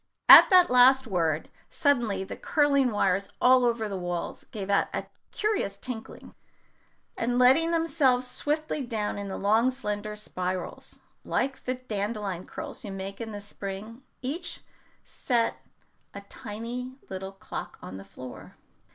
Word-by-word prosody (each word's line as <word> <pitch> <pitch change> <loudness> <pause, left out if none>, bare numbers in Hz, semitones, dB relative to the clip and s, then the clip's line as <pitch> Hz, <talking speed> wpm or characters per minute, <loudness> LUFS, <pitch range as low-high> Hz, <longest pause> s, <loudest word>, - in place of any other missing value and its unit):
At - - +11
that 365 -4 +6
last 260 +1 +6
word 165 -7 0 0.2
suddenly 235 -9 +1
the - - -7
curling 280 -4 +2
wires 195 -2 0
all 255 0 +5
over 230 -2 +1
the 200 - -4
walls 175 -1 -4
gave 200 -3 -6
out 200 0 +2
a - - -3 0.2
curious 420 - -1
tinkling, 225 +1 -7 0.8
and 245 +1 -1
letting 265 +7 +5
themselves 295 -7 +2
swiftly 300 +3 -2
down 215 -4 -2
in 200 -1 -5
long 215 +6 +2
slender 210 -5 -4
spirals, 185 -3 -5 0.2
like 270 +1 -2
the 255 - -1
dandelion 210 -6 -4
curls - - -7
you 205 - -6
make 195 +2 -6
in 225 -1 -5
the 205 -1 -6
spring, 205 +3 -7 0.2
each 340 +6 -4 0.4
set 235 -3 -1 0.6
a 200 - -6
tiny 235 +4 -7 0.2
little 190 +1 -6
clock 195 - -7
on 95 +1 -8
the 95 - -9
floor. 125 +6 -11
225 Hz, 140 wpm, -27 LUFS, 195-255 Hz, 0.8 s, At